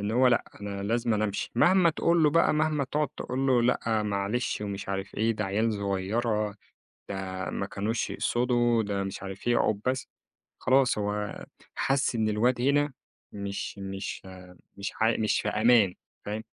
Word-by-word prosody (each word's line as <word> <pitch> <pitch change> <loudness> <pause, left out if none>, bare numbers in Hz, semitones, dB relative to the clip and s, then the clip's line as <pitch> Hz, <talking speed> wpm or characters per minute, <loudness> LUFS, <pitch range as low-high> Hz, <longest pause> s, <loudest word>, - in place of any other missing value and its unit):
إن 100 +1 -2
هو 125 +3 +4
لأ، 120 - +2 0.2
أنا 100 -1 -5
لازمًا 115 0 +1
أمشي. 100 -1 -3
مهما 175 +6 +5
تقول 170 +1 +2
له 150 - +5
بقى، 165 0 +3
مهما 155 -2 +1
تقعد 150 +3 -1
تقول 130 +2 -2
له 125 -3 +4
لأ 115 -2 +1
معلش 105 +4 -1
ومش 100 -1 -5
عارف 95 0 -4
إيه، 115 +2 +1
ده 105 -1 -3
عيال 110 +4 +1
صغيرة، 105 +2 -1 0.5
ده 95 -3 -4
ما - - -3
كانوش 110 +3 -2
يقصدوا، 120 -1 +1
ده 100 -2 -2
مش 95 - -6
عارف 95 +2 -8
إيه، 120 - +4
أقعُد 105 -2 +1
بس. 130 +1 0 0.5
خلاص، 130 -1 +3
هو 105 0 -3 0.3
حَسّ 135 -2 +1
إن 110 -1 +1
الواد 120 +4 +1
هنا 140 +1 +2 0.4
مش 100 0 -5
مش 95 0 -5 0.6
مش 100 0 -4
ح - - -2 0.2
مش 110 -1 +1
في - - -4
أمان 110 -4 +4 0.3
فاهم، 105 +2 -4
110 Hz, 165 wpm, -28 LUFS, 100-125 Hz, 0.6 s, مهما